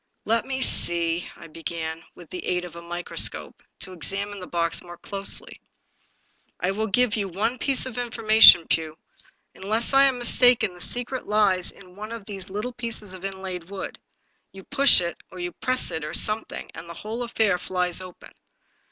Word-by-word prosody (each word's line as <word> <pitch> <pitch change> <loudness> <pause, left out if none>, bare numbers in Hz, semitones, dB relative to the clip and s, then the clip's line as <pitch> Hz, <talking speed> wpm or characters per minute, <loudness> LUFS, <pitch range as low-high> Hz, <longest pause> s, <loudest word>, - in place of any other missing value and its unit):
Let 230 +1 +1
me 265 -1 -1
see." 170 0 +2
I - - -12
began, 165 0 -5
with 175 -3 -14
the 180 - -6
aid 180 0 -1
of 175 - -11
a 170 - -8
microscope, 175 +1 -2 0.2
to 185 - -4
examine 200 +4 -4
the 180 - -8
box 170 -1 -1
more 175 -1 -11
closely. 200 +2 -4 0.5
" - - -42
I 180 - 0
will 220 +3 -1
give 230 +2 +3
you 205 -3 -1
one 215 +7 -2
piece 270 0 +1
of 250 -2 -5
information, 220 -7 +7
Pugh. 160 -1 -1 0.6
Unless 220 +6 0
I 275 0 +7
am 265 -2 +2
mistaken, 240 -4 +4
the 175 - -13
secret 245 +4 -2
lies 200 -4 +2
in 185 -2 -13
one 215 +2 -8
of 230 -3 -7
these 195 -2 -7
little 210 +6 -4
pieces 230 -5 -4
of 185 0 -11
inlaid 190 -3 -6
wood. 195 -1 -7 0.5
You 195 0 -12
push 280 -4 +5
it, 170 -1 -3
or 185 - -12
you 175 0 -4
press 255 +6 +1
it, 160 - -4
or 150 - -4
something, 215 +1 +1
and 165 +1 -10
the 170 - -8
whole 220 +6 -6
affair 220 -6 +1
flies 180 0 -1
open." 185 -1 -12
195 Hz, 185 wpm, -24 LUFS, 175-225 Hz, 0.6 s, information